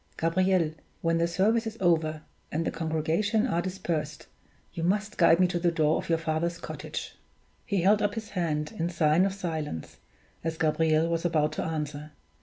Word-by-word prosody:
Gabriel, 170 Hz, -1 st, +2 dB, 0.3 s
when 165 Hz, 0 st, +2 dB
the 170 Hz, -, +2 dB
service 220 Hz, +7 st, +2 dB
is 220 Hz, 0 st, -6 dB
over, 160 Hz, -4 st, +1 dB, 0.3 s
and 165 Hz, +2 st, -1 dB
the -, -, 0 dB
congregation 165 Hz, +8 st, 0 dB
are 175 Hz, -9 st, 0 dB
dispersed, 170 Hz, -5 st, -3 dB, 0.5 s
you 165 Hz, -, -4 dB
must 200 Hz, +4 st, 0 dB
guide 170 Hz, -1 st, +5 dB
me 185 Hz, -, +6 dB
to 175 Hz, -1 st, -1 dB
the 175 Hz, 0 st, +2 dB
door 155 Hz, -2 st, +2 dB
of -, -, -5 dB
your 165 Hz, -, +3 dB
father's 165 Hz, +1 st, -1 dB
cottage." -, -, -6 dB, 0.5 s
He 200 Hz, -3 st, +1 dB
held 205 Hz, +3 st, +5 dB
up 205 Hz, 0 st, 0 dB
his 220 Hz, -2 st, -5 dB
hand, 160 Hz, -3 st, -1 dB
in 165 Hz, +1 st, 0 dB
sign 165 Hz, +2 st, +3 dB
of 195 Hz, -, -3 dB
silence, 160 Hz, -, -4 dB, 0.5 s
as 165 Hz, 0 st, -2 dB
Gabriel 160 Hz, 0 st, +2 dB
was 165 Hz, 0 st, -1 dB
about 155 Hz, -3 st, +2 dB
to -, -, -3 dB
answer. 150 Hz, -1 st, -4 dB
165 Hz, 180 wpm, -28 LUFS, 155-185 Hz, 0.5 s, me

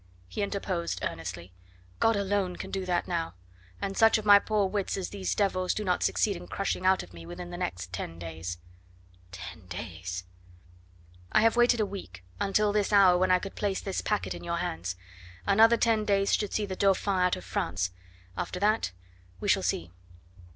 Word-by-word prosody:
he 210 Hz, -, -4 dB
interposed 195 Hz, -4 st, -2 dB
earnestly. 85 Hz, +2 st, -5 dB, 0.5 s
"God 225 Hz, 0 st, +4 dB
alone 200 Hz, -2 st, 0 dB
can -, -, -7 dB
do 190 Hz, -1 st, -3 dB
that 175 Hz, -1 st, 0 dB
now, 165 Hz, -, -2 dB, 0.4 s
and 195 Hz, 0 st, -3 dB
such 225 Hz, +2 st, +6 dB
of 215 Hz, -, -5 dB
my 205 Hz, -1 st, +9 dB
poor 210 Hz, -1 st, +1 dB
wits 195 Hz, 0 st, -2 dB
as 190 Hz, -, -3 dB
these 195 Hz, -2 st, -2 dB
devils 185 Hz, -3 st, +1 dB
do 215 Hz, -, -2 dB
not 180 Hz, -3 st, +1 dB
succeed 205 Hz, -2 st, +2 dB
in -, -, -9 dB
crushing 195 Hz, -1 st, -1 dB
out 190 Hz, 0 st, +4 dB
of 90 Hz, -, -14 dB
me 85 Hz, -1 st, -10 dB
within 175 Hz, -, -8 dB
the -, -, -5 dB
next 90 Hz, -, -4 dB
ten 85 Hz, -2 st, -5 dB
days." 85 Hz, +1 st, -5 dB, 0.7 s
Ten 90 Hz, 0 st, -9 dB
days! 90 Hz, -1 st, -5 dB, 1.1 s
"I -, -, +5 dB
have 225 Hz, +1 st, +4 dB
waited 240 Hz, 0 st, +4 dB
a 215 Hz, -, +3 dB
week, 180 Hz, -, -8 dB, 0.2 s
until 205 Hz, +1 st, +2 dB
this 210 Hz, -1 st, +1 dB
hour 195 Hz, -3 st, +7 dB
when 185 Hz, 0 st, +3 dB
I 185 Hz, -, +6 dB
could 195 Hz, +2 st, -6 dB
place 200 Hz, -2 st, -1 dB
this 195 Hz, -, -3 dB
packet 210 Hz, -1 st, -1 dB
in -, -, -8 dB
your 170 Hz, 0 st, -2 dB
hands; 90 Hz, -, -3 dB, 0.5 s
another 225 Hz, -, +6 dB
ten 225 Hz, -2 st, +2 dB
days 200 Hz, -1 st, +2 dB
should 210 Hz, -2 st, +1 dB
see 210 Hz, -, 0 dB
the 190 Hz, -2 st, -4 dB
Dauphin 195 Hz, 0 st, +2 dB
out 180 Hz, 0 st, +3 dB
of 90 Hz, -, -9 dB
France 90 Hz, 0 st, -1 dB, 0.4 s
after 180 Hz, -, -3 dB
that, 210 Hz, -, +2 dB, 0.5 s
we -, -, -4 dB
shall -, -, +4 dB
see." 85 Hz, +1 st, -1 dB
185 Hz, 190 wpm, -29 LUFS, -, 1.1 s, my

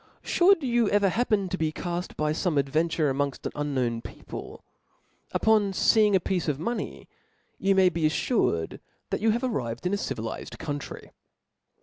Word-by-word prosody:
Should 355 Hz, -2 st, +4 dB
you 240 Hz, -4 st, +2 dB
ever 205 Hz, -1 st, +3 dB
happen 215 Hz, -2 st, +1 dB
to 185 Hz, -, -3 dB
be 160 Hz, -1 st, +1 dB
call 175 Hz, +2 st, -3 dB, 0.2 s
by 150 Hz, 0 st, +1 dB
fome 165 Hz, -1 st, 0 dB
ad 140 Hz, -1 st, +2 dB
venture 155 Hz, -1 st, +1 dB
amongft 140 Hz, 0 st, -2 dB
an -, -, -2 dB
unknown 130 Hz, -6 st, -1 dB
people, -, -, -9 dB, 0.7 s
upon 215 Hz, -3 st, +3 dB
feeing 210 Hz, +1 st, +4 dB
a -, -, +5 dB
piece 180 Hz, 0 st, -1 dB
of 145 Hz, -3 st, 0 dB
money, 230 Hz, +10 st, -4 dB, 0.5 s
you 195 Hz, 0 st, +2 dB
may 190 Hz, -1 st, +6 dB
be 165 Hz, -2 st, -1 dB
aflured, 155 Hz, -, 0 dB, 0.3 s
that -, -, -1 dB
you 220 Hz, 0 st, +4 dB
are 230 Hz, -, +1 dB
arrived 130 Hz, -, -2 dB
in 180 Hz, -, +1 dB
a -, -, +2 dB
civilized 115 Hz, -, -5 dB
country. 145 Hz, -1 st, -6 dB
175 Hz, 165 wpm, -27 LUFS, 145-210 Hz, 0.7 s, may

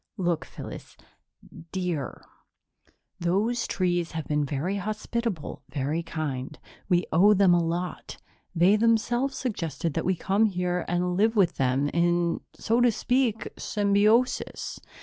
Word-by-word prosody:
"Look, 175 Hz, -4 st, 0 dB
Phyllis -, -, -10 dB, 0.7 s
dear 180 Hz, -7 st, -3 dB, 0.9 s
those 205 Hz, +8 st, 0 dB
trees 175 Hz, -3 st, 0 dB
have 160 Hz, -1 st, -4 dB
been 150 Hz, 0 st, 0 dB
very 150 Hz, +8 st, -2 dB
hospitable, 215 Hz, -2 st, -3 dB
very 145 Hz, +4 st, -1 dB
kind. 150 Hz, -4 st, -4 dB, 0.3 s
We 175 Hz, -1 st, +3 dB
owe 200 Hz, +6 st, +6 dB
them 190 Hz, -2 st, +5 dB
a 175 Hz, -1 st, +3 dB
lot. 175 Hz, +2 st, -4 dB, 0.4 s
They 180 Hz, +5 st, +5 dB
themselves 240 Hz, +4 st, +1 dB
suggested 165 Hz, -, -3 dB
that -, -, -1 dB
we 185 Hz, -, +2 dB
come 195 Hz, +5 st, +2 dB
here 180 Hz, -2 st, -1 dB
and 180 Hz, 0 st, 0 dB
live 220 Hz, +4 st, +2 dB
with 185 Hz, -5 st, +3 dB
them 135 Hz, +2 st, +1 dB
in, 170 Hz, 0 st, +1 dB
so 230 Hz, +2 st, +1 dB
to 245 Hz, -1 st, +5 dB
speak, 245 Hz, -1 st, 0 dB
symbiosis." 210 Hz, +4 st, +1 dB
180 Hz, 130 wpm, -26 LUFS, 165-215 Hz, 0.9 s, owe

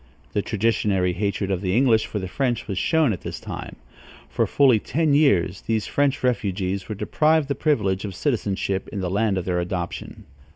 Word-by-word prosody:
The 105 Hz, -, +1 dB
traditionary 100 Hz, -4 st, +1 dB
hatred 100 Hz, +1 st, -2 dB
of 95 Hz, -2 st, -1 dB
the 95 Hz, +2 st, 0 dB
English 120 Hz, -4 st, +3 dB
for -, -, -4 dB
the 95 Hz, -2 st, -3 dB
French 120 Hz, +3 st, -1 dB
was 95 Hz, -2 st, -2 dB
shown 160 Hz, -8 st, +2 dB
at 90 Hz, -, -7 dB
this -, -, -6 dB
time. -, -, -7 dB, 0.6 s
For -, -, +1 dB
fully 130 Hz, -6 st, +4 dB
ten 155 Hz, +6 st, 0 dB
years 100 Hz, -, +3 dB
these 110 Hz, -1 st, 0 dB
French 140 Hz, -1 st, 0 dB
refugees 100 Hz, -5 st, -1 dB
were 110 Hz, -, -3 dB
deprived 155 Hz, +7 st, +1 dB
the -, -, +2 dB
privilege 105 Hz, -, 0 dB
of 100 Hz, -3 st, -5 dB
citizenship 100 Hz, -5 st, -1 dB
in 100 Hz, -, -4 dB
the 90 Hz, -1 st, -2 dB
land 100 Hz, 0 st, +1 dB
of 90 Hz, -, -3 dB
their 90 Hz, -1 st, 0 dB
adoption. 85 Hz, 0 st, -4 dB
105 Hz, 190 wpm, -23 LUFS, 95-130 Hz, 0.6 s, fully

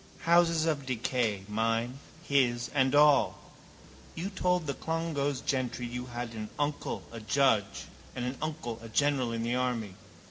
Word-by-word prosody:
Houses 170 Hz, -1 st, +4 dB
of 145 Hz, -4 st, -1 dB
decay, 120 Hz, -5 st, 0 dB
mine, 115 Hz, +4 st, -1 dB, 0.2 s
his 125 Hz, -6 st, +1 dB
and 135 Hz, -1 st, +3 dB
all. 145 Hz, -1 st, +5 dB, 0.8 s
You 185 Hz, +5 st, -4 dB
told 180 Hz, -3 st, +1 dB
the 140 Hz, -, -1 dB
Clongowes 155 Hz, -3 st, -2 dB
gentry 130 Hz, -2 st, -1 dB
you 125 Hz, +1 st, -5 dB
had 120 Hz, -1 st, -5 dB
an 110 Hz, -1 st, -5 dB
uncle 145 Hz, 0 st, -2 dB
a 115 Hz, -, -7 dB
judge 110 Hz, -2 st, +1 dB, 0.3 s
and 125 Hz, -, -2 dB
an 125 Hz, +2 st, -2 dB
uncle 150 Hz, -7 st, -4 dB
a 115 Hz, -, -9 dB
general 135 Hz, 0 st, +2 dB
in 115 Hz, 0 st, -2 dB
the 120 Hz, +1 st, 0 dB
army. 125 Hz, -5 st, -1 dB
130 Hz, 150 wpm, -30 LUFS, 115-145 Hz, 0.8 s, all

